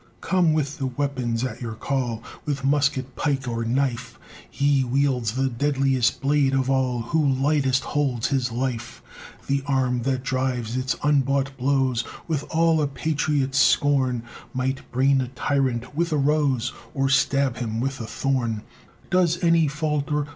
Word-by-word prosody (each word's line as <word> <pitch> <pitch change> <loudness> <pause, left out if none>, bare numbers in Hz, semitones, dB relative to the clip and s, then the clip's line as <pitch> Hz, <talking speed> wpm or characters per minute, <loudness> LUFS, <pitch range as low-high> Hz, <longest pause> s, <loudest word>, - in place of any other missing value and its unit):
Come 180 -4 +2
with 150 0 -1
the 135 - -1
weapons 130 -3 -2
at 125 -2 -4
your 115 -2 -4
call 120 -2 -2 0.2
With 140 -2 -3
musket, 135 -2 +1
pike, 140 -3 -1
or 115 -1 -2
knife; 125 0 -1 0.3
He 140 -1 +2
wields 125 -3 0
the 135 +1 +1
deadliest 135 -1 +1
blade 140 -1 +2
of 135 0 +1
all 130 -3 +1
Who 155 +7 +1
lightest 135 -1 +2
holds 135 -5 -1
his 130 -3 0
life. 120 -1 -4 0.4
The 140 0 0
arm 130 -3 +1
that 130 +1 -1
drives 130 -3 -1
its 130 +1 -1
unbought 140 -2 +1
blows 130 -2 +1 0.2
With 150 -3 -1
all 165 -1 +3
a 145 - +1
patriot's 140 -2 0
scorn, 130 -5 +3 0.3
Might 130 +1 -2
brain 135 +2 +3
a 130 - -3
tyrant 130 -1 -1
with 170 +2 0
a 155 - +2
rose 140 -4 +1 0.2
Or 135 0 +1
stab 135 -1 +2
him 115 -2 -3
with 135 +2 -2
a 110 - -5
thorn. 120 -4 -1 0.5
Does 180 -2 +3
any 165 -2 +4
falter? 150 0 -1
135 Hz, 155 wpm, -24 LUFS, 125-145 Hz, 0.5 s, any